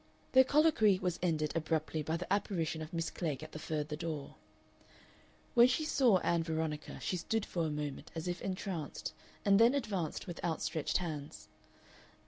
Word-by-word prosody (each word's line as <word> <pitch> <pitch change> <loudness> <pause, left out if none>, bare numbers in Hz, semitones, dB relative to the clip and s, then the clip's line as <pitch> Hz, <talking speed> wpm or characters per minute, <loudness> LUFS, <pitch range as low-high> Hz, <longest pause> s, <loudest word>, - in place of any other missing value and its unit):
Their 260 0 +8
colloquy 275 - +4
was 180 -2 -2
ended 155 -4 0
abruptly 160 -1 0
by 160 +2 -1
the 180 +2 -2
apparition 170 -6 -1
of 155 +1 -6
Miss 165 -2 -2
Klegg 155 -4 -3
at 155 - -9
the 155 - -7
further 150 -1 -3
door. 155 -3 -4 1.2
When 240 -1 +8
she 255 +5 0
saw 255 -9 +4
Ann 170 -1 +2
Veronica 160 -2 -3
she 180 - -1
stood 215 +6 -1
for 170 -3 -1
a - - -2
moment 150 -2 -4
as 160 +1 -4
if 175 0 -3
entranced, 185 -5 -4 0.3
and 200 0 +6
then 235 +4 +6
advanced 200 - -2
with 175 -2 -7
outstretched 160 -2 0
hands. 155 -5 -6
165 Hz, 165 wpm, -34 LUFS, 155-200 Hz, 1.2 s, Their